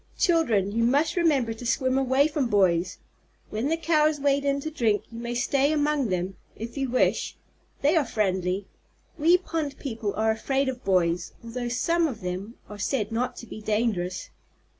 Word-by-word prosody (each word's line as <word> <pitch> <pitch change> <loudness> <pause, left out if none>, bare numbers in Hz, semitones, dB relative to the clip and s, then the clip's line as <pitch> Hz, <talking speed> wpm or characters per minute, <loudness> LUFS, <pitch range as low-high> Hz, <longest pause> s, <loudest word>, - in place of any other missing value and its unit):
Children, 235 - +2
you 230 +2 +1
must 280 +7 +2
remember 290 -10 +2
to 225 - -10
swim 260 +2 +1
away 270 +2 +3
from 295 -4 -1
boys. 185 -4 +2 0.5
When 225 +7 -1
the 325 - +1
Cows 310 -2 +2
wade 280 0 +2
in 280 0 +1
to 315 - -4
drink, 225 -9 +1
you 230 - -7
may 235 0 -4
stay 275 +3 +2
among 295 -3 +1
them, 185 +1 -2 0.2
if 230 +2 -7
you 270 -2 -1
wish. 255 - +1 0.5
They 295 +5 +4
are 320 - +4
friendly. 190 -4 -1 0.5
We 335 +4 +6
pond 320 -5 -4
people 225 -6 -4
are 220 +1 +2
afraid 265 +5 0
of 255 -1 -6
boys, 175 -2 +1
although 240 +1 -4
some 335 +7 +1
of 245 -7 -6
them 185 +5 -5
are 210 0 -10
said 215 0 -1
not 245 +3 -1
to - - -8
be 215 - -9
dangerous." 210 -4 -1
240 Hz, 180 wpm, -26 LUFS, 210-285 Hz, 0.5 s, We